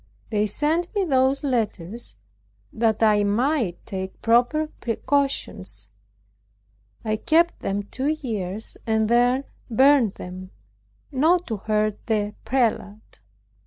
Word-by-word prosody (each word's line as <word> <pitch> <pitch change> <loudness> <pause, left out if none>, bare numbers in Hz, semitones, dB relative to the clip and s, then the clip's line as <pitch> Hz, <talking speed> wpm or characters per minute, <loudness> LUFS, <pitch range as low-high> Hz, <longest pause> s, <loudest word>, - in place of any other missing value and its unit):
They 210 -1 +2
sent 310 - 0
me 400 -2 +2
those 270 -2 +2
letters 230 - -2 0.6
that 225 -1 +1
I 210 -1 +4
might 225 - 0
take 190 -2 -5
proper 245 +7 +3
precautions. 225 - -1 1.2
I 215 0 0
kept 335 +7 +2
them 200 +1 -2
two 260 +7 -4
years, 220 -9 -3
and 220 -1 +2
then 245 +3 +3 0.3
burned 260 -2 +4
them, 185 +1 -8 0.6
not 330 +6 +3
to 220 - -1
hurt 215 0 0
the 210 -2 0
prelate. 220 -4 -1
225 Hz, 110 wpm, -24 LUFS, 205-275 Hz, 1.2 s, I